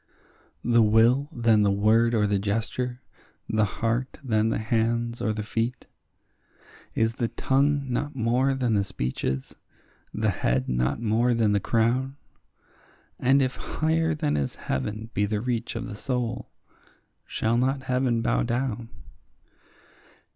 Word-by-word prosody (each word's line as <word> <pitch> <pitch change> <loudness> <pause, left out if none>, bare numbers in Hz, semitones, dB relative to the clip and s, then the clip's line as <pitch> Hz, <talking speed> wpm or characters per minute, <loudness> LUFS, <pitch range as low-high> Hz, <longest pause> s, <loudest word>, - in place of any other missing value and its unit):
The 120 0 +4
will 115 +6 +4
than 115 -6 +3
the 100 - +3
word 110 +4 +3
or 105 -2 +3
the 100 -1 +1
gesture, 115 +5 -2 0.4
the 110 -1 +2
heart 115 +5 -2
than 110 -3 +1
the - - 0
hands 115 +1 0
or 115 -2 +1
the 110 0 -3
feet? 115 +3 -2 1.1
Is 115 0 +2
the 120 -1 -1
tongue 140 +3 +1
not 145 +4 -2
more 125 +3 +1
than 125 -4 0
the 100 -1 +2
speech 65 -9 -4
is? 65 0 -2 0.6
the - - 0
head 65 +2 0
not 60 - 0
more 115 +2 +2
than 110 -2 +2
the 100 - +3
crown? 120 +6 +1 1.0
And 135 +2 +4
if 130 0 -2
higher 160 0 0
than 75 - 0
is 70 -2 -2
heaven 105 - -4
be 105 0 +1
the 105 0 -1
reach 120 0 -2
of 115 +2 -3
the 115 -5 -7
soul, 125 +1 -3 0.8
shall 115 +1 0
not 130 +1 0
heaven 125 -3 0
bow - - +1
down? 120 -1 -2
115 Hz, 145 wpm, -26 LUFS, 110-125 Hz, 1.1 s, The